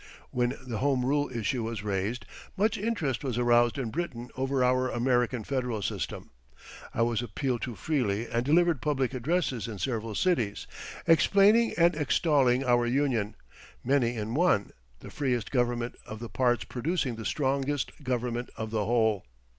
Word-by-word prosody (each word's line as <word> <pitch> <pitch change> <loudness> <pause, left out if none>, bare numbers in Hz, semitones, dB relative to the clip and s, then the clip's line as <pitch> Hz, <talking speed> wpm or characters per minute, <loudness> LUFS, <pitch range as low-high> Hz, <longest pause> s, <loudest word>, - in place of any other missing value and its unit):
When 125 +2 0
the 115 -4 -4
Home 130 -2 +1
Rule 145 +2 +1
issue 120 +1 -1
was 110 -2 -4
raised, 105 +4 -2 0.3
much 215 +3 +2
interest 195 - -1
was 125 -4 -2
aroused 120 0 +3
in 125 -5 -3
Britain 125 -7 -4
over 135 0 0
our 130 +1 +2
American 120 -1 +1
Federal 125 -6 -2
system. 100 -4 -4 0.6
I 115 - +1
was 115 0 0
appealed 120 +2 -2
to 120 -3 -4
freely 115 - -1
and 115 +1 -1
delivered 165 +1 +3
public 135 -4 0
addresses 130 -2 -1
in 110 -3 -6
several 115 -1 -3
cities, 120 - 0 0.4
explaining 200 +7 +5
and 170 +1 +5
extolling 140 -4 +2
our 120 -1 +3
union, 120 -5 0 0.5
many 125 -2 +2
in 110 0 -3
one, 155 - +2 0.3
the - - -10
freest 125 -6 -1
government 120 -2 0
of 110 - -6
the 115 +1 -7
parts 120 -2 +1
producing 130 -1 -2
the 110 - -7
strongest 135 +4 -1
government 125 -1 -2
of 110 -1 -5
the 110 -2 0
whole. 110 - +1
125 Hz, 155 wpm, -28 LUFS, 115-140 Hz, 0.6 s, explaining